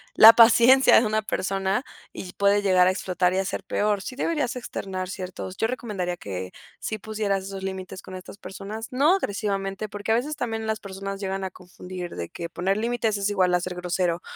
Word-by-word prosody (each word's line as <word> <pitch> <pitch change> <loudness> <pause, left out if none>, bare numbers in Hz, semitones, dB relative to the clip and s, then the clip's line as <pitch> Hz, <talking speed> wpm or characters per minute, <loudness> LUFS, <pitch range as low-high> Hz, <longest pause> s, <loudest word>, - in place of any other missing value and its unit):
la 225 +1 +11
paciencia 235 +3 +7
de 230 - 0
una 215 0 +1
persona, 195 +1 -1 0.3
y 180 -1 -8
puede 200 +1 +3
llegar 185 -2 +5
a - - +4
explotar 180 -1 0
y 185 - 0
a 195 - 0
ser 195 - -4
peor. 205 +1 0
Sí 255 - -7
deberías 275 -4 -1
externar 190 -6 -5
ciertos 185 -1 -6
yo 225 - +1
recomendaría 205 -8 -3
que 95 - -6 0.3
sí 215 - -3
pusieras 205 -2 -2
esos 195 0 -6
límites 190 0 -5
con 185 - -10
estas 185 +2 -10
personas. 210 +4 -7
No 285 +8 +4
agresivamente, 200 - -2
porque, 205 +2 -4
a - - +5
veces 285 +6 -1
también, 225 -4 -3
las 220 0 -1
personas 195 0 -6
llegan 195 0 -3
a 190 - -3
confundir 180 0 -9
de 85 -1 -5
que 170 0 -6
poner 185 +3 -1
límites 225 -2 0
es 200 +1 0
igual 185 -3 +2
a 180 - +3
ser 180 0 -4
grosero, 180 -1 -1
195 Hz, 200 wpm, -25 LUFS, 185-220 Hz, 0.3 s, la